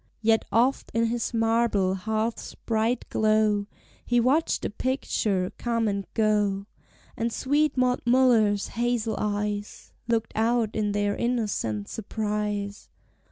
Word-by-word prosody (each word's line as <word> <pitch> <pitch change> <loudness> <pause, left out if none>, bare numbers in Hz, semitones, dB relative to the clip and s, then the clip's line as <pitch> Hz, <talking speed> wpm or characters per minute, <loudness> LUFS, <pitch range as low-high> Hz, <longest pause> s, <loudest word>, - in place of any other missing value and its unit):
Yet 225 0 +3
oft, 245 +4 +2
in 230 0 +3
his 235 +1 -1
marble 225 -4 +2
hearth's 220 +4 -3
bright 225 +2 -1
glow, 215 -1 +2 0.4
He 240 0 +2
watched 270 +7 +1
a - - -2
picture 210 -6 -1
come 230 -2 0
and 200 -1 -2
go; 210 -3 +1 0.5
And 230 +1 -1
sweet 290 +5 +1
Maud 250 -1 +2
Muller's 235 -5 +3
hazel 235 -2 -1
eyes 205 0 -3
Looked 230 -1 0
out 225 0 +1
in 210 -1 0
their 205 0 0
innocent 205 - -1
surprise. 210 -1 -3
220 Hz, 120 wpm, -26 LUFS, 205-235 Hz, 0.5 s, Yet